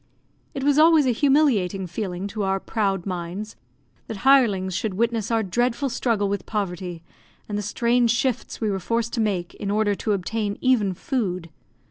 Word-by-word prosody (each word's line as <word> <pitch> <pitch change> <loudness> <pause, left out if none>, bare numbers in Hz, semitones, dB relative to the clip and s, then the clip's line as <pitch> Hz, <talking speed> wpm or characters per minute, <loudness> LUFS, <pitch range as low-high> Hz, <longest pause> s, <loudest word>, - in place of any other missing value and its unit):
It 270 - -3
was 290 +1 +3
always 320 -2 +6
a 255 - +3
humiliating 240 -9 +2
feeling 180 0 -4
to 215 +1 -4
our 195 0 0
proud 195 -4 -1
minds, 185 +3 -5 0.5
that 205 -3 -7
hirelings 210 -9 +4
should 195 +1 -2
witness 230 0 0
our 225 -1 +1
dreadful 240 +7 0
struggle 225 -5 0
with 200 -2 -3
poverty, 180 -5 -4 0.4
and 210 - -4
the 210 - -1
strange 235 +4 +1
shifts 245 +1 -1
we 215 -2 0
were 195 - -2
forced 230 +5 -1
to 235 - 0
make 190 -5 -1
in 200 - -5
order 210 0 +2
to 210 +1 -1
obtain 205 +2 -2
even 215 -8 +2
food. 185 - -3
210 Hz, 170 wpm, -24 LUFS, 190-235 Hz, 0.5 s, always